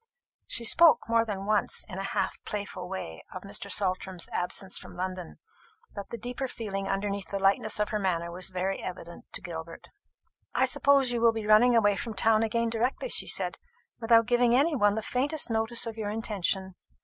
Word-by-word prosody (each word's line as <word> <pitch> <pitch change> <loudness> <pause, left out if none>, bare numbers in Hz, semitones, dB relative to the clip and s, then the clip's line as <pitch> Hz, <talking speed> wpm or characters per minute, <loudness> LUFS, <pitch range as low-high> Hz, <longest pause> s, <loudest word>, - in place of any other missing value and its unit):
She 235 - -2
spoke 315 -1 +6
more 230 0 +3
than 200 -3 -5
once, 210 0 0
in 190 -3 -7
a - - -3
half - - -2
playful 200 -3 -5
way, 135 - -6
of 185 - -8
Mr. 200 0 -4
Saltram's 185 -2 -1
absence 185 +1 -3
from - - -12
London; 185 - -5 0.6
but 200 - -7
the 235 - -5
deeper 245 +3 -4
feeling 195 -5 -5
underneath 200 0 -2
the 200 - -2
lightness 195 +2 +2
of 210 - 0
her 210 - -1
manner 170 -3 -1
was 180 +2 -1
very 185 +1 -2
evident 170 -2 -8
to - - -4
Gilbert. 165 -1 -8 0.7
"I - - +4
suppose 275 -3 +3
you 240 -1 -1
will 230 -1 +5
be 220 -1 -4
running 220 +3 +5
away 205 -3 +4
from 225 +1 -5
town 220 +2 +3
again 230 +1 0
directly," 245 - -1
she - - -1
said, - - +1 0.4
"without 230 0 +4
giving 240 0 +3
any 295 +4 +3
one 205 -5 +3
the 220 - -3
faintest 275 +2 -1
notice 225 +2 +2
of 225 -1 -6
your 210 -2 -3
intention. 195 -3 -2
210 Hz, 190 wpm, -28 LUFS, 190-230 Hz, 0.7 s, spoke